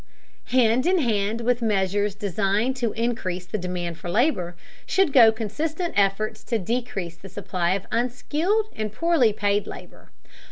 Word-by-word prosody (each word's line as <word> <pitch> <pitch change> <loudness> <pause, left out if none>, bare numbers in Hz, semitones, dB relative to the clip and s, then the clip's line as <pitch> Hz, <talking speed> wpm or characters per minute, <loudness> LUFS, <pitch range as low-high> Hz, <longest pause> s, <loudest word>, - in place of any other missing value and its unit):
Hand 250 +2 +3
in 370 +1 +4
hand 225 - 0
with 245 +1 +1
measures 205 -1 0
deigned 205 +4 0
to 235 -3 -1
increase 220 -6 -2
the 195 +4 -4
demand 175 -2 -4
for 175 - -6
labor 180 - +1 0.3
should 380 -7 +2
go 230 -4 +8
consistent 305 - -3
efforts 205 +2 +1
to 235 - 0
decrease 195 -5 -3
the 195 - -12
supply 180 -2 -1
of 195 - -5
unskilled 305 - 0
and 215 -1 -3
poorly 295 -2 +3
paid 205 0 0
labor. - - -11
215 Hz, 150 wpm, -24 LUFS, 195-250 Hz, 0.3 s, go